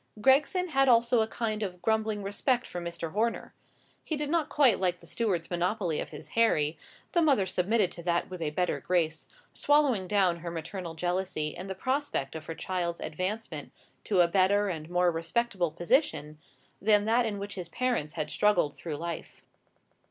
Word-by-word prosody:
Gregson 295 Hz, -, +3 dB
had 270 Hz, -3 st, +3 dB
also 235 Hz, 0 st, +5 dB
a 220 Hz, -, +1 dB
kind 220 Hz, -1 st, -3 dB
of 180 Hz, -4 st, -4 dB
grumbling 220 Hz, 0 st, 0 dB
respect 240 Hz, +6 st, 0 dB
for 175 Hz, -, -6 dB
Mr. 170 Hz, -1 st, -5 dB
Horner: 225 Hz, +5 st, -1 dB, 0.5 s
he 315 Hz, -, -2 dB
did 295 Hz, 0 st, -2 dB
not 330 Hz, -3 st, +1 dB
quite 265 Hz, -8 st, +4 dB
like 180 Hz, -1 st, +1 dB
the -, -, -15 dB
steward's 185 Hz, -8 st, -1 dB
monopoly 175 Hz, -1 st, 0 dB
of -, -, -4 dB
his -, -, -9 dB
Harry: 160 Hz, -10 st, +2 dB, 0.4 s
the 345 Hz, -, +3 dB
mother 275 Hz, -, +4 dB
submitted 190 Hz, +2 st, +1 dB
to 170 Hz, -, -8 dB
that 170 Hz, 0 st, 0 dB
with 185 Hz, -2 st, -8 dB
a 155 Hz, -, 0 dB
better 180 Hz, +4 st, -1 dB
grace, 165 Hz, -3 st, 0 dB, 0.3 s
swallowing 280 Hz, -10 st, +3 dB
down 185 Hz, -3 st, +2 dB
her 170 Hz, +1 st, -6 dB
maternal 170 Hz, +1 st, -6 dB
jealousy 175 Hz, -2 st, -1 dB
in 180 Hz, +5 st, -8 dB
the 190 Hz, -, -4 dB
prospect 260 Hz, -, -1 dB
of 155 Hz, -1 st, -7 dB
her 165 Hz, -, -4 dB
child's 175 Hz, -2 st, -2 dB
advancement 185 Hz, 0 st, -4 dB, 0.3 s
to 190 Hz, -4 st, +3 dB
a 175 Hz, -, +5 dB
better 195 Hz, +3 st, +3 dB
and 160 Hz, -3 st, -5 dB
more 180 Hz, 0 st, +3 dB
respectable 175 Hz, +2 st, -1 dB
position 175 Hz, -, 0 dB, 0.4 s
than 210 Hz, 0 st, +4 dB
that 230 Hz, +2 st, +3 dB
in 205 Hz, -2 st, -3 dB
which 200 Hz, 0 st, -5 dB
his 180 Hz, -3 st, -6 dB
parents 235 Hz, -10 st, -1 dB
had 150 Hz, -2 st, -3 dB
struggled 185 Hz, -8 st, +2 dB
through 155 Hz, -4 st, -5 dB
life. 170 Hz, +1 st, -6 dB
190 Hz, 180 wpm, -29 LUFS, 170-230 Hz, 0.5 s, also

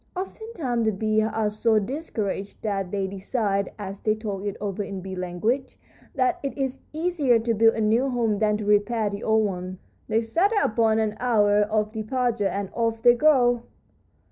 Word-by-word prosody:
Oftentimes 365 Hz, -, -3 dB
the 220 Hz, -, +3 dB
bees 215 Hz, +2 st, +1 dB
are 220 Hz, -1 st, 0 dB
so 220 Hz, +1 st, +2 dB
discouraged 210 Hz, -5 st, -3 dB
that 195 Hz, -4 st, -2 dB
they 195 Hz, 0 st, -1 dB
decide, 200 Hz, +1 st, -1 dB
as 195 Hz, -1 st, -6 dB
they 215 Hz, -1 st, +1 dB
talk 205 Hz, -3 st, -5 dB
it 200 Hz, -, -4 dB
over 205 Hz, 0 st, -3 dB
in 195 Hz, -1 st, -6 dB
bee 190 Hz, 0 st, -6 dB
language, 185 Hz, +9 st, -2 dB, 0.4 s
that 365 Hz, -2 st, +1 dB
it 275 Hz, -2 st, -4 dB
is 270 Hz, -1 st, -2 dB
easier 310 Hz, -6 st, +2 dB
to 230 Hz, +1 st, 0 dB
build 225 Hz, +1 st, +4 dB
a 225 Hz, -, -1 dB
new 230 Hz, +5 st, +2 dB
home 230 Hz, -5 st, 0 dB
than 210 Hz, -1 st, +2 dB
to 210 Hz, -, -5 dB
repair 210 Hz, +1 st, +2 dB
the 200 Hz, +1 st, -6 dB
old 220 Hz, 0 st, +3 dB
one. 185 Hz, -1 st, -4 dB, 0.3 s
They 220 Hz, +1 st, +2 dB
settle 350 Hz, -, +1 dB
upon 220 Hz, 0 st, +2 dB
an 215 Hz, -1 st, 0 dB
hour 210 Hz, -4 st, +3 dB
of 215 Hz, 0 st, 0 dB
departure, 230 Hz, -1 st, 0 dB
and 200 Hz, 0 st, -3 dB
off 230 Hz, -1 st, -1 dB
they 240 Hz, -1 st, +8 dB
go." 245 Hz, -3 st, +4 dB
220 Hz, 180 wpm, -25 LUFS, 205-245 Hz, 0.4 s, they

